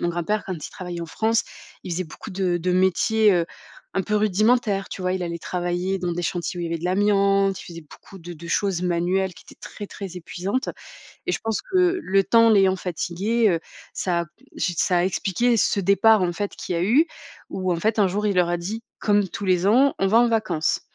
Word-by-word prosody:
Mon 175 Hz, -, 0 dB
grand 175 Hz, 0 st, -2 dB
père, 210 Hz, +4 st, -1 dB
quand 190 Hz, -, -3 dB
il 155 Hz, -, -8 dB
travaillait 180 Hz, -2 st, -6 dB
en 170 Hz, -, -6 dB
France, 225 Hz, +6 st, +1 dB, 0.4 s
il 180 Hz, -, -4 dB
faisait 185 Hz, +2 st, -2 dB
beaucoup 165 Hz, +6 st, -10 dB
de 185 Hz, -2 st, 0 dB
de 180 Hz, +2 st, -1 dB
métiers, 200 Hz, +4 st, +3 dB
heu, 170 Hz, -1 st, +1 dB, 0.5 s
un 195 Hz, -, +1 dB
peu 210 Hz, +3 st, 0 dB
rudimentaires. 210 Hz, 0 st, +2 dB
Tu 190 Hz, -, -7 dB
vois, 185 Hz, 0 st, 0 dB
il 185 Hz, -, -3 dB
allait 170 Hz, -1 st, -4 dB
travailler 180 Hz, +2 st, -2 dB
dans 180 Hz, -1 st, -2 dB
des 175 Hz, +1 st, -3 dB
chantiers 175 Hz, +1 st, -3 dB
où -, -, -3 dB
il -, -, -2 dB
y -, -, -4 dB
avait 165 Hz, 0 st, -2 dB
de 170 Hz, -, -9 dB
l'amiante, 195 Hz, 0 st, +2 dB
il -, -, -11 dB
faisait 170 Hz, -1 st, -9 dB
beaucoup 195 Hz, -, -14 dB
de 175 Hz, 0 st, -9 dB
de 170 Hz, +1 st, -11 dB
choses 195 Hz, -1 st, 0 dB
manuelles 180 Hz, +2 st, 0 dB
qui 180 Hz, -, -16 dB
étaient -, -, -17 dB
très, 205 Hz, -, -8 dB
très 195 Hz, -2 st, -8 dB
épuisantes 185 Hz, -, -3 dB, 0.6 s
et -, -, 0 dB
je -, -, 0 dB
pense 225 Hz, -1 st, -2 dB
que 365 Hz, -1 st, +2 dB
le 195 Hz, +1 st, +2 dB
temps, 230 Hz, +1 st, +5 dB
l'ayant 195 Hz, -3 st, +4 dB
fatigué, 190 Hz, +6 st, 0 dB
heu, 165 Hz, -2 st, 0 dB, 0.3 s
ça 175 Hz, -2 st, 0 dB
a -, -, -2 dB
p 255 Hz, -, -25 dB
j 175 Hz, -, -1 dB
ça 180 Hz, -2 st, +2 dB
a 175 Hz, -, +2 dB
expliqué 215 Hz, +5 st, +1 dB
ce 200 Hz, -, +2 dB
départ 200 Hz, +2 st, +4 dB
en 175 Hz, -1 st, 0 dB
fait 205 Hz, +3 st, -3 dB
qui 180 Hz, -, -4 dB
a 170 Hz, -, 0 dB
eu 255 Hz, -, +4 dB, 0.4 s
ou 185 Hz, -1 st, -1 dB
en 170 Hz, -, -2 dB
fait 220 Hz, +4 st, 0 dB
un 200 Hz, -, +5 dB
jour 205 Hz, +3 st, -1 dB
il 205 Hz, -, +1 dB
leur 180 Hz, -1 st, +3 dB
a 175 Hz, -, +1 dB
dit 210 Hz, +7 st, -5 dB, 0.2 s
comme 205 Hz, -1 st, +2 dB
tous 200 Hz, -, -6 dB
les 185 Hz, 0 st, +2 dB
ans: 265 Hz, +6 st, +4 dB
«On 195 Hz, -, +3 dB
va 220 Hz, +4 st, +5 dB
en 240 Hz, 0 st, +4 dB
vacances». 215 Hz, -9 st, 0 dB
190 Hz, 240 wpm, -23 LUFS, 175-210 Hz, 0.6 s, temps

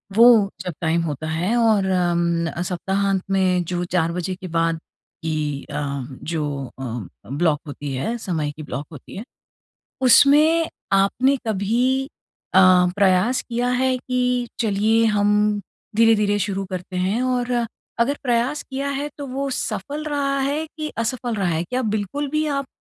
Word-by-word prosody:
वो 225 Hz, -3 st, +7 dB
जब 180 Hz, -3 st, -4 dB
टाइम 165 Hz, +1 st, +1 dB
होता 155 Hz, -1 st, -3 dB
है 175 Hz, +9 st, 0 dB
और 220 Hz, -4 st, +3 dB
अम, 170 Hz, -2 st, 0 dB
सप्ताहांत 190 Hz, +1 st, -1 dB
में 185 Hz, -2 st, +2 dB
जो 175 Hz, -, -1 dB
4 170 Hz, -2 st, 0 dB
बजे 180 Hz, +1 st, -3 dB
के 185 Hz, 0 st, -8 dB
बाद 165 Hz, -1 st, 0 dB, 0.4 s
की 150 Hz, -3 st, -2 dB
अम, 140 Hz, -3 st, -3 dB, 0.2 s
जो 150 Hz, -4 st, -3 dB
अ, 120 Hz, -6 st, -5 dB, 0.2 s
ब्लॉक 145 Hz, +2 st, +1 dB
होती 145 Hz, 0 st, -5 dB
है, 225 Hz, -, -2 dB
समय 160 Hz, -8 st, -2 dB
की 155 Hz, +1 st, -10 dB
ब्लॉक 145 Hz, 0 st, -5 dB
होती 145 Hz, -, -11 dB
है, 215 Hz, -, -5 dB, 0.8 s
उसमें 300 Hz, +6 st, +5 dB, 0.2 s
आपने 240 Hz, +8 st, +3 dB
कभी 235 Hz, +6 st, +1 dB, 0.5 s
अ, -, -, +7 dB, 0.4 s
प्रयास 200 Hz, +6 st, +3 dB
किया 240 Hz, +1 st, 0 dB
है 255 Hz, +1 st, +1 dB
कि 250 Hz, -1 st, 0 dB
चलिए 220 Hz, +1 st, +2 dB
हम 210 Hz, 0 st, +2 dB, 0.4 s
धीरे-धीरे 210 Hz, -2 st, +4 dB
शुरू 195 Hz, 0 st, -2 dB
करते 185 Hz, 0 st, -5 dB
हैं? 190 Hz, +7 st, 0 dB
और 245 Hz, -2 st, 0 dB, 0.3 s
अगर 280 Hz, +5 st, +2 dB
प्रयास 245 Hz, +3 st, 0 dB
किया 275 Hz, +1 st, -4 dB
है 280 Hz, +1 st, -2 dB
तो 285 Hz, -, -5 dB
वो 275 Hz, +1 st, -3 dB
सफल 260 Hz, +5 st, -3 dB
रहा 280 Hz, -2 st, 0 dB
है 290 Hz, +4 st, -1 dB
कि 310 Hz, -1 st, -3 dB
असफल 235 Hz, +1 st, -1 dB
रहा 195 Hz, -4 st, 0 dB
है? 165 Hz, 0 st, 0 dB
क्या 250 Hz, +8 st, -2 dB
बिल्कुल 215 Hz, +6 st, -2 dB
भी 310 Hz, 0 st, 0 dB
आप 275 Hz, -2 st, -1 dB
205 Hz, 155 wpm, -22 LUFS, 170-250 Hz, 0.8 s, वो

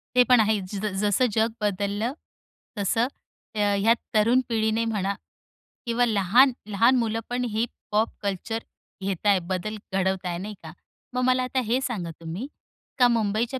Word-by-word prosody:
ते 250 Hz, -, +7 dB
पण 250 Hz, -1 st, +7 dB
आहे 215 Hz, -1 st, +3 dB
ज 195 Hz, +2 st, -6 dB, 0.2 s
जसं 210 Hz, +4 st, +3 dB
जग 225 Hz, +2 st, +2 dB
बदललं. 205 Hz, +3 st, -1 dB, 0.6 s
तसं, 225 Hz, +4 st, +1 dB, 0.5 s
अ, 210 Hz, -, -2 dB
ह्या 205 Hz, +3 st, +4 dB, 0.2 s
तरुण 230 Hz, +4 st, +4 dB
पिढीने 220 Hz, 0 st, +1 dB
म्हणा 200 Hz, -3 st, -1 dB, 0.7 s
किंवा 240 Hz, +1 st, +2 dB
लहान, 230 Hz, +5 st, +4 dB
लहान 230 Hz, +5 st, +4 dB
मुलं 225 Hz, -2 st, 0 dB
पण 245 Hz, +1 st, -1 dB
ही 225 Hz, +2 st, +1 dB, 0.3 s
पॉप 215 Hz, +2 st, +2 dB
कल्चर 205 Hz, +3 st, -2 dB, 0.4 s
घेत 195 Hz, +1 st, -2 dB
आहे, 200 Hz, -2 st, +5 dB
बदल 185 Hz, +4 st, -3 dB, 0.2 s
घडवत 190 Hz, 0 st, 0 dB
आहे 175 Hz, -1 st, -2 dB
नाही 210 Hz, +4 st, -6 dB
का? 160 Hz, -1 st, -9 dB, 0.4 s
मग 250 Hz, -, +1 dB
मला 255 Hz, 0 st, +3 dB
आता 255 Hz, +1 st, -1 dB
हे 245 Hz, +3 st, +3 dB
सांगा 205 Hz, -11 st, -3 dB
तुम्ही, 170 Hz, +10 st, -5 dB, 0.5 s
का 245 Hz, -, +7 dB
मुंबईच्या 230 Hz, +2 st, 0 dB
215 Hz, 160 wpm, -25 LUFS, 200-235 Hz, 0.7 s, ते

